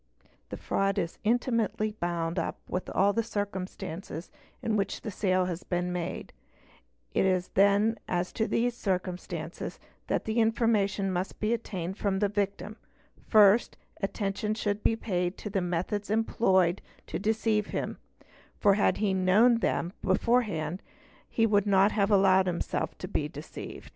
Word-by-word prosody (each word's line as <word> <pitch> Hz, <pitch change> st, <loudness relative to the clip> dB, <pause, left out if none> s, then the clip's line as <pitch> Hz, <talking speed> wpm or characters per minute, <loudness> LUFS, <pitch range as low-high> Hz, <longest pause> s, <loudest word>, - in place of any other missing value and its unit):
The -, -, -5 dB
fraud 195 Hz, +1 st, 0 dB
is 170 Hz, -3 st, -2 dB
intimately 225 Hz, -2 st, +1 dB
bound 170 Hz, -4 st, -2 dB
up -, -, -3 dB
with 180 Hz, -, -3 dB
all 200 Hz, +2 st, +3 dB
the 230 Hz, -, +1 dB
circumstances 190 Hz, -5 st, -5 dB, 0.3 s
in 220 Hz, -, 0 dB
which 200 Hz, -1 st, -1 dB
the 215 Hz, -, -5 dB
sale 185 Hz, -1 st, +1 dB
has 180 Hz, -1 st, -4 dB
been 180 Hz, 0 st, -2 dB
made; 175 Hz, -2 st, -4 dB, 0.8 s
it -, -, +2 dB
is 185 Hz, -1 st, +1 dB
then 205 Hz, +3 st, +3 dB
as 180 Hz, 0 st, -1 dB
to 220 Hz, -, 0 dB
these 240 Hz, +1 st, +1 dB
circumstances 180 Hz, -5 st, -4 dB, 0.3 s
that -, -, -1 dB
information 220 Hz, -3 st, +2 dB
must 185 Hz, +1 st, -3 dB
be 215 Hz, +2 st, +1 dB
obtained 190 Hz, -4 st, -4 dB
from 200 Hz, -2 st, 0 dB
the 205 Hz, +1 st, +1 dB
victim; 205 Hz, +1 st, -2 dB, 0.5 s
first, 215 Hz, +1 st, +5 dB, 0.2 s
attention 200 Hz, +1 st, -2 dB
should 205 Hz, -1 st, -1 dB
be 225 Hz, -, +2 dB
paid 180 Hz, -4 st, -2 dB
to 210 Hz, -, -6 dB
the 195 Hz, -1 st, 0 dB
methods 180 Hz, +4 st, -2 dB
employed 190 Hz, -5 st, +2 dB, 0.2 s
to -, -, -4 dB
"deceive 215 Hz, 0 st, +1 dB
him, -, -, -4 dB, 0.6 s
for 200 Hz, -, +4 dB
had 205 Hz, -, +2 dB
he 205 Hz, -2 st, +1 dB
known 205 Hz, +6 st, +4 dB
them 175 Hz, -5 st, -1 dB
beforehand 190 Hz, -5 st, +1 dB, 0.5 s
he 225 Hz, -, +2 dB
would 205 Hz, -2 st, +2 dB
not 195 Hz, +1 st, +5 dB
have 200 Hz, -1 st, +1 dB
allowed 190 Hz, -2 st, +5 dB
himself 175 Hz, -1 st, -2 dB
to -, -, -6 dB
the -, -, -1 dB
deceived. -, -, -9 dB
200 Hz, 150 wpm, -29 LUFS, 185-215 Hz, 0.8 s, first